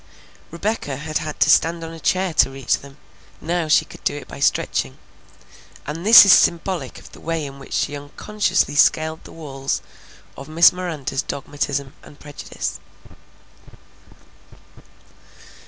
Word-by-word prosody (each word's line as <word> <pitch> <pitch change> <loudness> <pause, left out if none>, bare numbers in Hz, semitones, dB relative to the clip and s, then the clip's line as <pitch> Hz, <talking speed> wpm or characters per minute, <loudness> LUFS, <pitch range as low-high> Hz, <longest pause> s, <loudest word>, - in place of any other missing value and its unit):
Rebecca 170 -4 -3
had 155 +2 -3
had 155 -1 -6
to - - +4
stand 165 0 +2
on 165 0 -7
a 165 - -10
chair 185 +2 0
to 150 - +4
reach 135 -2 -1
them; 140 0 -15 0.4
now 170 0 -2
she 155 - +3
could - - -15
do - - 0
it - - -9
by - - -10
stretching; 65 - 0 0.9
and 155 +3 -6
this 220 +1 +10
is 195 - +8
symbolic 170 -5 +1
of - - -14
the - - -14
way 165 -2 -3
in 140 0 -10
which 135 - -11
she 145 - -1
unconsciously 145 +3 -1
scaled 160 +1 +2
the - - -12
walls 135 -4 -4 0.6
of 140 +2 -11
Miss 165 +2 +6
Miranda's 155 -7 -4
dogmatism 140 0 -4
and 145 - -16
prejudice. 145 -1 -6
155 Hz, 145 wpm, -21 LUFS, 140-170 Hz, 0.9 s, this